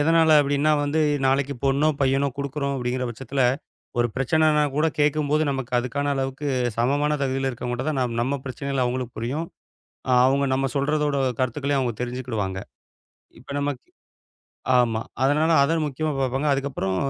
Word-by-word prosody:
எதனால 160 +1 +4
அப்படீன்னா 145 +2 +2
வந்து, 150 +2 0 0.3
நாளைக்கு 135 +1 +1
பொண்ணோ, 140 +3 +3
பையனோ 135 +1 +2
குடுக்குறோம் 140 0 -2
அப்படீங்கிற 125 0 -2
பட்சத்துல, 130 +3 -2 0.6
ஒரு 120 - +3
பிரச்சனன்னா 150 +3 +3
கூடக் 155 +1 0
கேட்கும்போது 150 +1 +2
நமக்கு 135 -3 -4
அதுக்கான 140 +4 -2
அளவுக்கு 135 +2 -3 0.3
சமமான 145 +5 +1
தகுதியில 135 0 -1
இருக்கவங்க 125 0 -4
கிட்ட 125 +3 -4
தான் 145 -3 -1
நாம் 120 -2 -1
நம்ம 135 +3 -1
பிரச்சனைகள் 135 0 -2
அவங்களுக்கு 125 0 -3
புரியும். 140 +9 -3 0.8
அவுங்க 140 +2 +2
நம்ம 135 +1 +1
சொல்றதோட 145 +1 +1 0.2
கருத்துக்களையும் 135 +3 0
அவுங்க 120 -3 -2
தெரிஞ்சுக்கிடுவாங்க. 120 -6 -3 0.8
இப்ப - - -14
நமக்கு 140 -3 -3 0.9
ஆமா. 115 -2 +2 0.2
அதனால 150 +4 +3
அத 160 +4 +2
முக்கியமா 150 +2 -2
பார்ப்பாங்க. 135 +3 0
அதுக்கப்புறம் 135 -9 -2
135 Hz, 140 wpm, -24 LUFS, 125-145 Hz, 0.9 s, எதனால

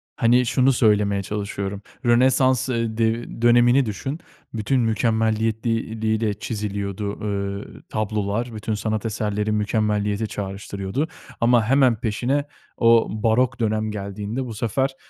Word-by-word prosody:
Hani, 120 +2 +3
şunu 130 +3 +3
söylemeye 105 -4 +2
çalışıyorum, 100 -1 -4 0.2
Rönesans, 130 +1 +3
ııı, 115 -2 -1
dev 115 0 -1
dönemini 120 +2 +5
düşün, 135 +8 -4 0.3
bütün 115 +4 +1
mükemmeliyetliği 110 0 0
liği 110 0 +1
ile 110 -2 0
çiziliyordu, 100 -1 -4 0.6
eee, - - -13
tablolar, 110 +2 -2
bütün 110 +1 -3
sanat 110 +1 -2
eserleri 105 -1 -1
mükemmeliyete 105 0 0
çağrıştırıyordu 100 +5 -4 0.3
ama 120 -1 +4
hemen 130 0 +4
peşine 125 +5 0 0.3
o 115 -1 +5 0.2
Barok 120 +2 +2
dönem 110 -1 0
geldiğinde 105 +4 -4
bu 120 - -6
sefer 130 +5 -1
110 Hz, 120 wpm, -23 LUFS, 105-120 Hz, 0.6 s, dönemini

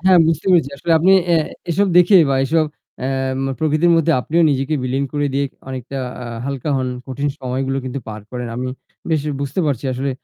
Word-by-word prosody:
হ্যাঁ, 185 0 +5
বুঝতে 165 +1 -1
পেরেছি। 165 -6 +4
আসলে 165 +4 0
আপনি 180 +4 +4 0.2
এ - - +6 0.4
এসব 200 +5 +2
দেখে 180 +3 +7
বা 135 - +2
এসব 160 +3 +2 0.4
এম 135 0 -1 0.2
প্রকৃতির 155 +2 +3
মধ্যে 165 0 +3
আপনিও 165 +6 +1
নিজেকে 135 +2 0
বিলীন 130 +2 -1
করে 145 -1 0
দিয়ে 140 +1 +1 0.2
অনেকটা 130 +1 -6 0.3
আ - - -6 0.2
হালকা 140 +1 -4
হন। 130 -1 -1 0.2
কঠিন 140 +2 -2
সময়গুলো 135 +1 -2
কিন্তু 130 +1 -4
পার 110 0 -6
করেন। 125 -1 -4
আমি 125 +1 -3 0.4
বেশ 160 -2 +2 0.2
বুঝতে 140 +6 -2
পারছি 140 -3 -1
আসলে 135 +2 -2
140 Hz, 190 wpm, -19 LUFS, 130-160 Hz, 0.4 s, দেখে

